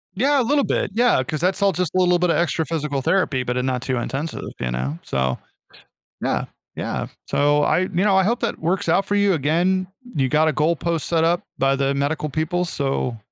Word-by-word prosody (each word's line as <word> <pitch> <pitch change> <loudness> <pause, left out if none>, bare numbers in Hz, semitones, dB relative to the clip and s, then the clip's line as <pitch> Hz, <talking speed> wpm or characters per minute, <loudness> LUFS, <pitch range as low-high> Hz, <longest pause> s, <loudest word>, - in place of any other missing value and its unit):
Yeah 275 +6 +3
a - - +1
little 285 +4 +2
bit, - - -1
yeah, 240 - +3
'cause 155 +3 -4
that's 185 +3 +1
all 200 -1 +4
just 180 -2 -1
a - - +3
little 180 -1 +3
bit 180 -1 +2
of - - +2
extra 165 -2 0
physical 150 -3 -2
therapy, 145 -6 +1
but 125 0 -2
a 125 - 0
not 130 -1 -1
too 130 -1 -2
intensive, 135 +6 -3 0.2
you 60 - -2
know? 65 +5 -3
So, 65 -1 -1 0.9
yeah, - - 0 0.3
yeah, - - -3 0.2
so 145 +1 +2
I 170 - +2
you 185 - -1 0.2
know, 195 -2 +4
I 190 - +4
hope 235 +5 0
that 235 - -2
works 180 +3 -1
out 190 +4 +3
for 205 - -1
you. 200 -2 +3
Again, 175 +6 +1 0.3
you 135 -2 +2
got 155 +2 +3
a - - +1
goalpost 165 +2 0
set 165 -1 +1
up 170 +1 +2 0.2
by 135 0 +2
the 140 0 0
medical 145 +2 -1
people, 160 +4 -1
so 135 -7 -2
160 Hz, 220 wpm, -22 LUFS, 135-185 Hz, 0.9 s, all